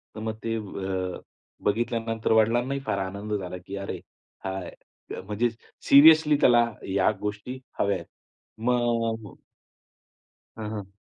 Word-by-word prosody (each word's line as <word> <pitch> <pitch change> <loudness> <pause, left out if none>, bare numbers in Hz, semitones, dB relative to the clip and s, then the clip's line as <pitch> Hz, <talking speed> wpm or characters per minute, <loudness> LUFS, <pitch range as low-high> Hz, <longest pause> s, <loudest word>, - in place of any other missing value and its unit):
तर - - -6
मग 110 0 -4
ते 115 0 -1
अ, 95 -3 -4 0.5
बघितल्यानंतर 115 +1 0
वडिलांनाही 120 +5 +3
फार - - 0
आनंद 100 +3 -4
झाला, 90 -3 -3
की 95 +2 -8
अरे 100 - -5 0.5
हा 95 0 -2 0.6
म्हणजे 105 +4 0 0.4
सिरियसली 155 +1 +8
त्याला 120 -1 +6 0.2
या 95 +1 +3
गोष्टी 105 +5 -4 0.2
हव्या 100 0 +2
आहेत. - - -9 0.5
मग 115 -2 0 1.2
हां, 110 -1 -4
हां. 100 -3 -6
110 Hz, 120 wpm, -26 LUFS, 100-120 Hz, 1.2 s, सिरियसली